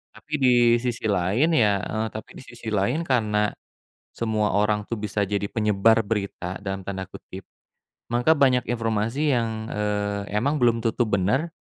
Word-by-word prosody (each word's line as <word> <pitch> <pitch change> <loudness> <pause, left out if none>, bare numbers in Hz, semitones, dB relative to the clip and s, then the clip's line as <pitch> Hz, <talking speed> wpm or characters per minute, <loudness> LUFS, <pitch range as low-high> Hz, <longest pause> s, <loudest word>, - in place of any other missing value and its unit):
Tapi - - -18
di 130 - +6 0.3
sisi 120 -2 -3
lain, 100 - +2
ya, 105 - +3
eee, 110 +1 -2
tapi 110 - -8
di - - -11
sisi 120 -1 -12
lain 115 +11 0
karena 105 -7 +1 0.6
semua 110 -2 -1
orang, 105 0 +1
tuh, 115 -3 -3
bisa 105 0 -1
jadi 100 +1 -1
"penyebar 110 +1 +2
berita" 100 -4 -3
dalam 95 -1 -5
tanda 95 -1 -5
kutip. 95 0 -11 0.6
Maka 135 +7 +3
banyak 125 -3 +3
informasi 115 +5 0
yang, 110 -2 -1
eee, 105 -1 -2
emang 140 +6 0
belum 120 -1 +4
tentu 115 +2 +1
bener, 105 - +1
110 Hz, 155 wpm, -24 LUFS, 100-120 Hz, 0.6 s, di